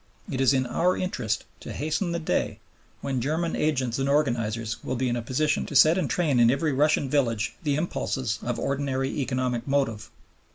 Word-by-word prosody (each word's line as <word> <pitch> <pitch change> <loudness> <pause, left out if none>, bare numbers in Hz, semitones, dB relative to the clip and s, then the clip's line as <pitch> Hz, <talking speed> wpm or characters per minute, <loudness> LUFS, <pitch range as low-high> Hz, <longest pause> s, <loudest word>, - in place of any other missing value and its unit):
It 130 - -1
is 135 - +5
in 130 -1 +2
our 175 +9 +1
interest 125 - -2 0.2
to - - -8
hasten 155 +4 -1
the 170 - -1
day 170 - -1 0.4
when 130 -3 -2
German 160 +6 -1
agents 130 -5 0
and 135 +1 0
organizers 115 -6 0
will 130 - -2
be 130 +1 0
in 120 - 0
a 120 - -2
position 140 +6 0
to 145 - -7
set 155 +4 +7
in 180 -5 0
train 150 -7 +1
in 115 -1 +6
every 140 +4 +1
Russian 145 +1 +2
village 120 -5 0
the 145 -3 0
impulses 130 -7 -2
of 120 -1 -2
ordinary 135 -1 -1
economic 130 -2 -1
motive. 135 -6 0
135 Hz, 190 wpm, -26 LUFS, 120-150 Hz, 0.4 s, set